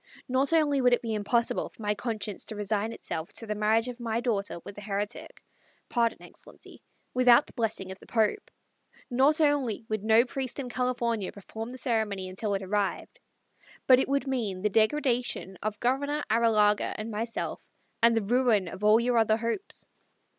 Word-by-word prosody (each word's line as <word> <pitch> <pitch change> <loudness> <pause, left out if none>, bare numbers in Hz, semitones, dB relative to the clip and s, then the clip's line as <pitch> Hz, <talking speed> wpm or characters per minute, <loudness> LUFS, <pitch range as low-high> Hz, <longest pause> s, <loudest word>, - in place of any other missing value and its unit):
"Not 260 +3 +2
only 295 -4 +3
would 250 -1 +4
it 245 - +1
be 225 -1 -2
impossible 220 +3 0
for - - -26
my 210 0 +1
conscience 210 -2 -4
to 220 - -6
resign 210 +1 -1
itself 160 -7 -5
to 225 - -5
the 210 - -2
marriage 215 +3 +2
of 250 0 -6
my 230 -1 -1
daughter 205 -7 -2
with 200 - -9
a - - -9
heretic 205 0 -5 0.5
pardon, 235 -2 0
Excellency - - -13 0.3
without 250 +2 +6
the - - -17
blessing 215 -5 -2
of 190 - -9
the - - -16
Pope; 230 - 0 0.6
not 275 +6 +4
only 285 -8 +1
would 215 -2 -2
no 220 +2 +5
priest 260 -1 -4
in 265 -3 -4
California 235 -5 -1
perform 220 +3 -8
the 255 - -8
ceremony 220 -7 -1
until 200 +2 -2
it 195 - -3
arrived, 200 +1 -2 0.7
but 255 -1 +7
it 265 - 0
would 280 +1 +1
mean 220 -9 -2
the 210 - +3
degradation 240 -3 +1
of 210 -1 -3
Governor 285 +4 0
Arrillaga 215 -2 +3
and 215 +2 -5
myself, 225 +2 -3 0.4
and 230 0 +5
the 225 - +1
ruin 230 -3 +2
of 185 +4 -8
all 215 +2 +6
your 240 0 +2
other 220 -1 +3
hopes. 230 - -4
225 Hz, 180 wpm, -28 LUFS, 210-250 Hz, 0.7 s, but